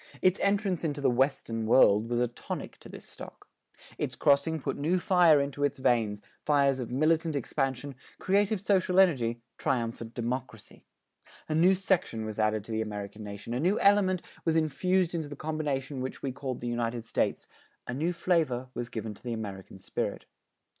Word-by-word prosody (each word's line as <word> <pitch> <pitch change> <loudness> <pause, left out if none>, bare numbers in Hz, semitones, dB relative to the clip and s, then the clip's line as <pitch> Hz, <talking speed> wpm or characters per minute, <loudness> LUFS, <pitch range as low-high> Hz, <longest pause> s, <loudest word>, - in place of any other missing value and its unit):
Its 185 0 +4
entrance 200 -3 +1
into 145 -3 -2
the 135 -3 +2
"Western 120 -3 0
World" 110 -2 +5
was 120 0 0
a 125 - +2
tonic 120 - -7
to - - -13
this - - -11
stock. - - -11 0.5
Its - - -2
crossing 145 +3 +2
put - - -3
new 160 +6 +1
fire 175 -4 +5
into 140 0 -2
its 145 0 +1
veins 110 -5 +1 0.2
fires 140 -2 +3
of 120 - -4
militant 155 +4 +1
expansion, 135 0 -2 0.2
creative 200 +2 +1
social 190 -2 +2
energy, 120 -11 +3 0.2
triumphant 115 -2 -2
democracy. 120 -2 -5 0.6
A 155 - -2
new 175 +5 +5
section 180 - 0
was 110 0 -5
added 110 -1 +1
to 115 - -9
the 110 0 0
American 105 0 -6
nation, 105 +3 -7
a 125 - -1
new 180 +8 +2
element 195 -3 +3 0.2
was 165 -1 +1
infused 175 +4 +1
into 160 -3 -3
the 145 - -7
combination 145 -3 -3
which 130 - -5
we 135 - -1
call 130 0 -4
the 120 - -8
United 120 -1 -2
States, - - -1 0.4
a - - -4
new 155 +7 0
flavor 160 -8 0
was 120 0 -4
given 110 -1 -5
to - - -17
the 120 -2 -4
American 100 -4 -7
spirit. 95 - -4
135 Hz, 175 wpm, -29 LUFS, 115-165 Hz, 0.6 s, World